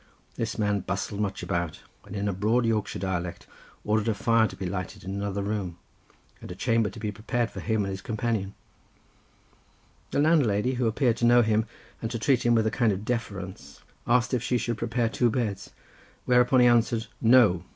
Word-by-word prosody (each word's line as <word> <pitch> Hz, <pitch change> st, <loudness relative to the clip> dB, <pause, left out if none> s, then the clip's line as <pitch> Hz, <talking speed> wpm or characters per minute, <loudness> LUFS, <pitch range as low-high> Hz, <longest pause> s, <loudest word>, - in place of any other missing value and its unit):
This 115 Hz, 0 st, -3 dB
man 105 Hz, -2 st, +1 dB
bustled 100 Hz, +2 st, -3 dB
much 100 Hz, -3 st, -3 dB
about, 85 Hz, -2 st, -2 dB, 0.2 s
and 100 Hz, -, -9 dB
in 100 Hz, 0 st, -2 dB
a 100 Hz, -, 0 dB
broad 110 Hz, +6 st, +1 dB
Yorkshire 110 Hz, -3 st, -1 dB
dialect 90 Hz, -2 st, -3 dB, 0.4 s
ordered 105 Hz, +1 st, +1 dB
a 110 Hz, -, +1 dB
fire 115 Hz, 0 st, +3 dB
to -, -, -10 dB
be 95 Hz, -, -5 dB
lighted 90 Hz, 0 st, -5 dB
in 95 Hz, -, -5 dB
another 100 Hz, 0 st, -3 dB
room, 100 Hz, -4 st, -3 dB, 0.6 s
and -, -, -9 dB
a -, -, -6 dB
chamber 115 Hz, -2 st, +1 dB
to 100 Hz, -, -11 dB
be 105 Hz, -2 st, -3 dB
prepared 115 Hz, +3 st, -2 dB
for -, -, -7 dB
him 110 Hz, -2 st, 0 dB
and 100 Hz, -, -3 dB
his 95 Hz, -1 st, -5 dB
companion; 110 Hz, -4 st, -2 dB, 1.5 s
the -, -, -3 dB
landlady, 130 Hz, -7 st, +3 dB
who 125 Hz, -2 st, 0 dB
appeared 115 Hz, +1 st, +1 dB
to 120 Hz, -, +1 dB
know 120 Hz, 0 st, +6 dB
him, 110 Hz, 0 st, +1 dB, 0.3 s
and 115 Hz, -, -2 dB
to 120 Hz, -, -3 dB
treat 120 Hz, +2 st, +2 dB
him 120 Hz, 0 st, +3 dB
with 110 Hz, -1 st, +2 dB
a 110 Hz, -, +1 dB
kind 120 Hz, -4 st, +2 dB
of 100 Hz, +2 st, -4 dB
deference, 100 Hz, -6 st, -5 dB, 0.2 s
asked 125 Hz, +1 st, +2 dB
if 125 Hz, -, +1 dB
she 125 Hz, 0 st, 0 dB
should 120 Hz, -1 st, -3 dB
prepare 120 Hz, 0 st, 0 dB
two 120 Hz, +1 st, +1 dB
beds; 105 Hz, -4 st, -2 dB, 0.6 s
whereupon 125 Hz, +1 st, +4 dB
he -, -, +6 dB
answered 120 Hz, -1 st, +3 dB, 0.2 s
"No! 110 Hz, -7 st, +5 dB
110 Hz, 195 wpm, -27 LUFS, 100-120 Hz, 1.5 s, know